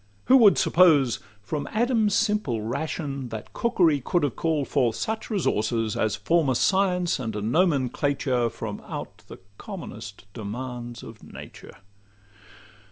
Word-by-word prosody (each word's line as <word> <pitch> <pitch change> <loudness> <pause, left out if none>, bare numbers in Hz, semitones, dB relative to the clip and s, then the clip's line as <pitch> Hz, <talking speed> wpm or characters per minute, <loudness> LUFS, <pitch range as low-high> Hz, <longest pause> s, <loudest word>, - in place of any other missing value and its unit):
Who 265 - +7
would 215 -6 +6
suppose, 160 -8 +4 0.2
from 145 +7 -4
Adam's 220 -3 +2
simple 210 - 0
ration, 140 +1 -4
That 110 -2 -8
cookery 170 - +2
could 175 +2 0
have 140 -5 -1
call'd 155 -4 -1
forth 125 -6 +1
such 220 - -3
resources, 115 - 0
As 110 - 0
form 165 -4 +1
a 130 - +1
science 180 +1 +2
and 115 -4 -4
a 105 - -3
nomenclature 135 - +1
From - - -6
out - - -6
the - - -10 0.2
commonest 115 - -8
demands 120 +2 -6
of 110 -1 -11
nature? - - -12
140 Hz, 135 wpm, -25 LUFS, 120-180 Hz, 0.2 s, Who